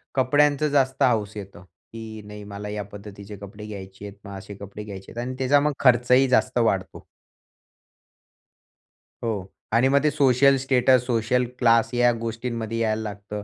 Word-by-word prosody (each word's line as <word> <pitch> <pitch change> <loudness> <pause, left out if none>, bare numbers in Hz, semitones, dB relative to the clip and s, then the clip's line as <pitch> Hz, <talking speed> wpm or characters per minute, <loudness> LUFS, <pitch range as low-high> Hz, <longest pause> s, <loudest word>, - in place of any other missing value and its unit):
कपड्यांचं 145 +3 +3
जास्त 135 -2 +1
हौस 110 -4 +1
येतो, 100 -3 -10
की 110 +5 -11
नाही 105 0 -10
मला 100 0 -7
या 105 0 -4
पद्धतीचे 100 0 -10
कपडे 100 +2 -10
घ्यायचे 95 -1 -9
आहेत. 100 - -11
मग 100 0 -8
असे 100 +1 -10
कपडे 100 +1 -9
घ्यायचे 95 -2 -10
आहेत 120 - -5
आणि 130 - -5
त्याचा 135 +2 +4
मग 150 0 0
खर्चही 125 +1 +4
जास्त 130 0 +2
वाढतो. 95 -6 -1 2.2
हो. 105 -5 -2 0.3
आणि 120 +3 +4
मग 140 +1 +3
ते 150 - +4
सोशल 140 -1 +4
स्टेटस, 130 -1 +3
सोशल 125 +1 +1
क्लास 115 0 +3
या 120 0 +4
गोष्टींमध्ये 115 0 -4
यायला 110 -1 0
लागतं. 105 -1 -6
115 Hz, 155 wpm, -24 LUFS, 100-130 Hz, 2.2 s, त्याचा